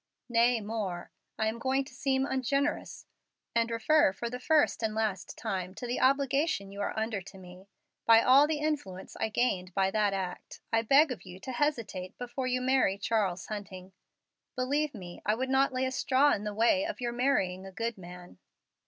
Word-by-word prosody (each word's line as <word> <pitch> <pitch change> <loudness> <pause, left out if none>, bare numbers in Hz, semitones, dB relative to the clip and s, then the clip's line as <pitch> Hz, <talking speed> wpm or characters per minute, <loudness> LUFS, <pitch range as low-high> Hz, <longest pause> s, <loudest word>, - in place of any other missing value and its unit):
Nay, 235 0 +3
more: 205 -5 -4 0.3
I 220 - 0
am 220 +2 -2
going 265 +2 +1
to 270 - -14
seem 265 0 0
ungenerous, 275 +2 -1 0.5
and 230 0 +2
refer 230 +3 +3
for 235 +4 -5
the 250 - -5
first 305 0 +2
and 220 -1 -1
last 215 -4 -2
time 185 -1 -4
to 245 - -6
the 245 +1 -2
obligation 275 -5 +1
you 200 +1 -6
are 200 - -3
under 220 -2 -1
to 195 +1 -13
me. 185 +1 -13 0.4
By 230 0 +7
all 275 +3 +6
the 310 -1 -1
influence 290 -12 -3
I 220 - -1
gained 190 -6 -1
by 195 -1 +2
that 210 -1 +1
act, 185 -2 -6
I 225 - +4
beg 275 +6 +5
of 250 - -5
you 185 -1 -11
to 260 - -6
hesitate 230 -9 -2
before 255 +1 -4
you 255 0 0
marry 260 -6 +2
Charles 200 -5 -1
Hunting. 190 -3 -8 0.6
Believe 280 +3 0
me, 180 -4 -9
I 210 - +1
would 260 +3 -3
not 270 +1 +3
lay 255 0 -1
a 260 - -1
straw 270 +2 +3
in 210 - -3
the 210 -1 -4
way 235 +7 +3
of 325 -1 -4
your 240 -1 -2
marrying 195 -8 0
a - - -9
good 230 +4 -3
man." 180 - -12
230 Hz, 195 wpm, -30 LUFS, 195-265 Hz, 0.6 s, By